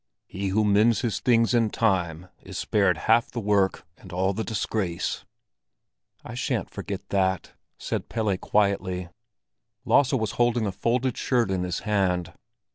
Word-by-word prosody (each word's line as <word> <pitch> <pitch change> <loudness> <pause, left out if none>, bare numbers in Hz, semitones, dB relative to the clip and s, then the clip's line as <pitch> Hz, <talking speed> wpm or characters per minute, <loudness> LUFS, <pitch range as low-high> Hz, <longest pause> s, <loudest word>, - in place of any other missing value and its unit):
"He 100 +1 -4
who 105 +3 +2
mends 105 +2 +4
his 115 -5 -1
things 115 -1 +3
in 115 -2 +3
time, 90 -6 0
is - - -8
spared 100 -5 +2
half 115 +6 +3
the 120 - -4
work 100 -3 +1
and 95 - -13
all 95 +2 0
the 110 +3 -2
disgrace." 105 -5 -2 1.0
"I - - -7
shan't - - -2
forget - - -6
that," 95 -2 0 0.3
said - - -4
Pelle 110 -4 0
quietly. 95 -3 0 0.8
Lasse 140 -1 +4
was 110 -6 0
holding 120 -1 +2
a 100 - -1
folded 120 +6 0
shirt 120 -6 +1
in 95 -1 0
his 90 -1 -2
hand. 95 -5 0
100 Hz, 150 wpm, -25 LUFS, 95-115 Hz, 1.0 s, mends